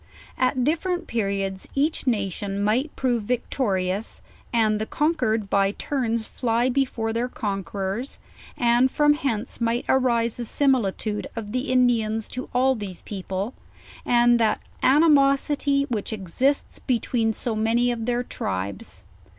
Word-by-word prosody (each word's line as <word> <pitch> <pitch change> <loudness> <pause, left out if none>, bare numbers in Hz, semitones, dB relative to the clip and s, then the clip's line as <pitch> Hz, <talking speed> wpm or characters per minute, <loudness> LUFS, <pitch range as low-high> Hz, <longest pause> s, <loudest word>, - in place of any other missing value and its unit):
At 255 0 +1
different 345 +5 0
periods 195 -3 -2
each 285 0 0
nation 200 -3 -1
might 240 +9 +1
prove 245 -3 0
victorious, 205 -4 -1 0.3
and 215 -2 +2
the 220 - -2
conquered 250 -9 0
by 195 0 +2
turns 230 -5 -1
fly 240 +1 0
be 270 +2 +2
fore 225 -3 -3
their 235 +2 0
conquerors, 200 +3 -3 0.4
and 240 +2 +4
from 295 +2 +4
hence 255 -7 -3
might 235 +1 0
arise 235 -3 +2
the - - -5
simili 250 -5 +1
tude 210 -1 -3
of 215 -3 -5
the 255 +3 -1
Indians 225 -4 +2
to 255 +1 -5
all 260 +2 +3
these 205 -7 -7
people, 195 +3 -4 0.5
and 240 0 +4
that 220 -2 +2 0.2
animosity 280 -1 +4
which 235 -7 -3
exists 220 - -1
between 235 -2 0
so 225 +1 -3
many 230 +3 +2
of 230 -1 -4
their 245 0 +1
tribes. 95 - -4
235 Hz, 135 wpm, -24 LUFS, 210-260 Hz, 0.5 s, and